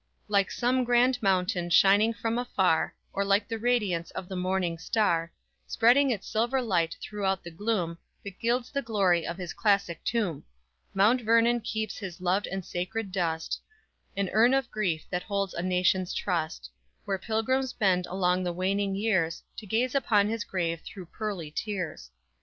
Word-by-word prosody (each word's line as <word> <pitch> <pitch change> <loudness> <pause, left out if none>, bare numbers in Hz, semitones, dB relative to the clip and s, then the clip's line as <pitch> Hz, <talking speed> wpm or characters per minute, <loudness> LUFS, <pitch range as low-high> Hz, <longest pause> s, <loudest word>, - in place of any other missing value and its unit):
_Like 200 -2 +2
some 255 +1 +1
grand 245 +1 +3
mountain 180 -3 +1
shining 200 +5 +5
from 230 +1 -2
afar, 190 -9 +1 0.2
Or 200 - 0
like 200 +1 +2
the 225 0 -4
radiance 210 -8 0
of 185 -1 -7
the 190 - -6
morning 180 -2 -1
star, 170 -3 +1 0.4
Spreading 260 +5 +4
its 215 -6 -2
silver 235 +4 +1
light 175 -9 0
throughout 195 -3 -2
the 170 - -8
gloom, 175 -3 -2 0.2
That 200 -2 -9
gilds 240 +1 0
the 280 - -1
glory 195 -8 +1
of 170 - -4
his 180 -3 -5
classic 200 -6 +1
tomb; 210 - -1 0.5
Mount 215 +6 +4
Vernon 230 +1 +3
keeps 220 -1 -3
his 190 -3 -7
loved 185 +3 0
and 190 -1 -4
sacred 190 +3 -4
dust 165 -4 -2 0.6
An 200 -2 0
urn 235 +5 +5
of 270 -3 -1
grief 180 -7 -1
that 180 - -1
holds 200 -2 -2
a 170 - -3
nation's 180 0 +1
trust, 160 - -2 0.3
Where 195 -1 -1
pilgrims 245 +6 0
bend 185 -5 +1
along 180 0 +1
the 175 - -1
waning 195 +2 0
years, 190 -6 0
To 215 - -8
gaze 240 +5 0
upon 210 -7 +3
his 225 -1 -2
grave 170 -3 -2
through 180 -4 -10
pearly 195 -8 -4
tears. 185 - -4
195 Hz, 165 wpm, -28 LUFS, 180-225 Hz, 0.6 s, shining